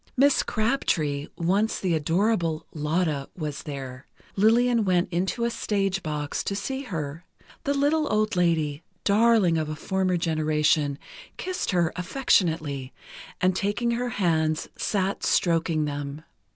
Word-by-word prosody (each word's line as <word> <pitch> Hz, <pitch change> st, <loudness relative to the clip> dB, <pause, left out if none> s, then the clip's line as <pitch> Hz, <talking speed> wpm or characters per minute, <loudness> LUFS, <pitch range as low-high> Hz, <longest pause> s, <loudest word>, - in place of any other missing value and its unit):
Miss 280 Hz, +2 st, +5 dB
Crabtree, 165 Hz, -, 0 dB
once 195 Hz, +6 st, +1 dB
the 185 Hz, -3 st, 0 dB
adorable 165 Hz, +1 st, +1 dB
"Lotta," 150 Hz, -2 st, -1 dB
was 150 Hz, -4 st, -4 dB
there. 135 Hz, -3 st, -7 dB, 0.3 s
Lillian 230 Hz, +3 st, +4 dB
went 180 Hz, -1 st, +1 dB
into 190 Hz, +7 st, 0 dB
a 235 Hz, -, 0 dB
stage 195 Hz, -4 st, -1 dB
box 150 Hz, -3 st, -3 dB
to 200 Hz, -, -1 dB
see 265 Hz, +7 st, -3 dB
her. 165 Hz, -, -5 dB, 0.4 s
The 280 Hz, -, +1 dB
little 295 Hz, +2 st, +2 dB
old 215 Hz, 0 st, +1 dB
lady, 160 Hz, -4 st, +1 dB, 0.2 s
darling 205 Hz, -5 st, +4 dB
of 155 Hz, -1 st, -2 dB
a 155 Hz, -, -3 dB
former 185 Hz, +2 st, 0 dB
generation, 155 Hz, -3 st, +1 dB, 0.4 s
kissed 370 Hz, 0 st, -3 dB
her 175 Hz, -3 st, +1 dB
affectionately, 160 Hz, -, 0 dB, 0.5 s
and 185 Hz, 0 st, +3 dB
taking 205 Hz, +5 st, 0 dB
her 245 Hz, +1 st, -1 dB
hands, 160 Hz, -7 st, 0 dB
sat 195 Hz, -1 st, -1 dB
stroking 165 Hz, -2 st, +2 dB
them. 145 Hz, +1 st, -5 dB
175 Hz, 130 wpm, -26 LUFS, 155-215 Hz, 0.5 s, Miss